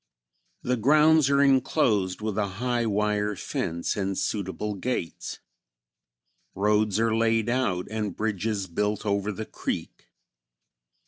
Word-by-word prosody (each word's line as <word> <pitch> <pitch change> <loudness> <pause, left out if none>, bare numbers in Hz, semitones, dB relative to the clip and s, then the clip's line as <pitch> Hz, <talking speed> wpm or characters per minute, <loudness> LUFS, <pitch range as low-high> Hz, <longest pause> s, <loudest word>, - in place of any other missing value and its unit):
The 125 0 0
grounds 150 +4 +5
are 140 0 +4
inclosed 120 - +2
with 110 -2 -2
a 105 -1 0
high 120 0 0
wire 105 0 0
fence 85 -2 -3
and 95 -1 -2
suitable 100 0 -2
gates. 100 -4 -4 1.1
Roads 105 +1 +2
are 115 -1 +2
laid 115 0 +2
out 120 -8 0
and 105 -4 -3
bridges 105 -1 -1
built 105 +4 -2
over 100 0 0
the 110 +2 -5
creek. - - -5
105 Hz, 120 wpm, -26 LUFS, 100-120 Hz, 1.1 s, grounds